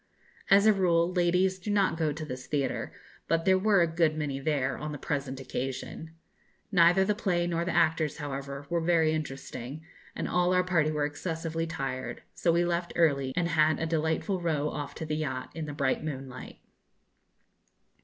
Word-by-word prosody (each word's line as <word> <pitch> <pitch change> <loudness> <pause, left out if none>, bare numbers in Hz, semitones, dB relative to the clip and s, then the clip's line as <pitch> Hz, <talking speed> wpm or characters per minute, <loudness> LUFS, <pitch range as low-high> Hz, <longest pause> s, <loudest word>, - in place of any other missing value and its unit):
As 200 +1 +6
a 215 - +7
rule, 175 -2 +2
ladies 180 +1 +2
do 200 - -6
not 200 -5 +2
go 160 -2 0
to 155 +2 -5
this 130 -3 -7
theatre, 140 -3 -1 0.4
but 165 0 +1
there 190 0 +5
were 200 -1 +4
a 165 -1 -2
good 160 -3 +2
many 145 -3 -2
there 140 -2 0
on 150 0 -5
the - - -5
present 140 -2 -3
occasion. 135 +5 -5 0.6
Neither 180 0 +5
the 210 - +2
play 185 -5 0
nor 170 -1 0
the 175 - -2
actors, 155 -2 +2
however, 140 -1 -5
were 170 -1 +1
very 165 -2 +3
interesting, 145 -1 -5 0.3
and - - -3
all 180 0 +2
our 180 - +4
party 170 -4 +2
were 150 -1 0
excessively 165 +2 -3
tired; 130 -5 -4
so 170 - +1
we 170 +1 +2
left 175 0 -1
early, 140 -6 +2
and 170 -1 +1
had 155 -1 +3
a 160 - -1
delightful 160 +4 0
row 150 -3 0
off 145 -1 -5
to 160 - -5
the 155 0 -2
yacht, 130 -5 -3
in 160 -2 -5
the - - -4
bright 140 0 0
moonlight. 135 -4 -6
160 Hz, 185 wpm, -29 LUFS, 145-175 Hz, 0.6 s, a